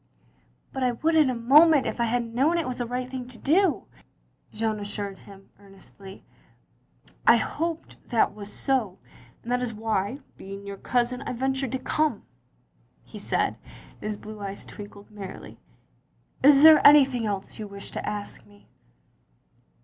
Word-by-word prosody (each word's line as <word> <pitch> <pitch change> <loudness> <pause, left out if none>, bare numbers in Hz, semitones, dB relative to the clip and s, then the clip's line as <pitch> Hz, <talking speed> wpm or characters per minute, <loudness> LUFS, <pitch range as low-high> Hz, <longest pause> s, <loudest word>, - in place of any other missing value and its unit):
" - - -37
But 265 - -4
I 250 -1 +1
would 320 +8 0
in 305 -4 +5
a 255 - -1
moment 285 +5 +5
if - - -3
I - - +3
had 235 0 -2
known 290 +8 +2
it 330 - -1
was 250 -1 -4
a 240 - -2
right 250 +1 -3
thing 255 -1 -6
to 250 -2 -13
do," 350 +7 +2 0.7
Jeanne 215 0 -2
assiired 205 -1 -6
him, 195 -1 -16
earnestly. 195 0 -14 0.5
" - - -31
I - - +9
hoped 330 0 -4
that 230 - +2
was 205 -1 -9
so, 235 -9 -1 0.5
and 235 - -6
that 250 0 +1
is 235 -3 -3
why, 220 +3 -2 0.2
being 195 +1 -9
yoiir 200 -1 -8
cousin, 250 +1 0
I - - -4
ventured 265 0 -2
to - - +1
come," 295 -2 -1 0.8
he - - -11
said, - - -1 0.3
and - - -26
his 210 0 -4
blue 215 +1 -10
eyes 200 -1 -7
twinkled 205 0 -12
merrily. 200 -3 -10 0.8
"Is 285 +1 +6
there 315 -1 +9
any 290 -1 +9
thing 245 -4 -3
else 200 0 -5
you 215 - -5
wish 200 0 -10
to - - -5
ask 205 -1 -7
me? 205 0 -21
235 Hz, 170 wpm, -25 LUFS, 205-265 Hz, 0.8 s, I